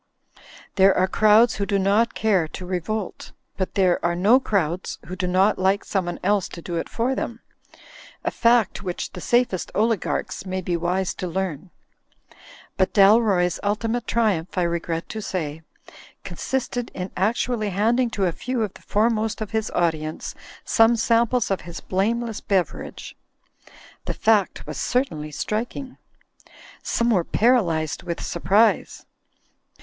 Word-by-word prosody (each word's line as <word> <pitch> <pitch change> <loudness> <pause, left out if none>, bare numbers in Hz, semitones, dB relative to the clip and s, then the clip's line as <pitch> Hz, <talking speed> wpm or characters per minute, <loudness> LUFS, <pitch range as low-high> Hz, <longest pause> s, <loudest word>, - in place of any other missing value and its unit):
There 195 0 +5
are 185 - +3
crowds 215 +3 +4
who 200 - -2
do 200 - +1
not 205 +4 +2
care 195 -7 +2
to 180 +4 -8
revolt; 185 +3 -4 0.2
but 190 - -3
there 185 -3 +2
are 170 0 +1
no 210 +9 +5
crowds 185 - -1
who 185 - -6
do 180 0 -2
not 190 +3 +3
like 190 +2 +1
someone 175 -3 -2
else 200 0 +1
to - - -9
do 175 - -4
it - - -3
for 240 +3 0
them; 235 -3 -4 0.8
a - - -1
fact 235 -3 +2
which 180 -3 -4
the 180 - -8
safest 240 -6 +1
oligarchs 220 0 -1
may 185 0 -3
be 180 -1 -2
wise 180 +2 -1
to 185 - -5
learn. 180 -1 -3 1.1
But 190 -1 +1
Dalroy's 195 -4 +4
ultimate 225 +3 -1
triumph 205 -5 0
(I 180 - +3
regret 170 -1 -2
to 220 - -5
say) 160 -6 -4 0.6
consisted 250 -2 -3
in 180 +1 -5
actually 215 +2 0
handing 230 +6 +1
to 195 - +2
a 175 - +1
few 250 +6 -2
of 205 -3 -4
the - - -15
foremost 220 0 0
of 215 -1 -5
his 220 -1 -1
audience 155 -2 -2 0.3
some 225 +1 +4
samples 235 +1 +2
of 195 - 0
his 170 0 -8
blameless 225 +4 -1
bever 190 -3 0
age. - - -10 0.9
The - - -3
fact 215 -3 +2
was - - -6
certainly 165 - -1
striking. 235 - -4 0.8
Some 235 0 0
were 185 -6 +3
paralysed 170 - +1
with 170 - -4
surprise. 195 +7 +1
200 Hz, 150 wpm, -23 LUFS, 180-225 Hz, 1.1 s, There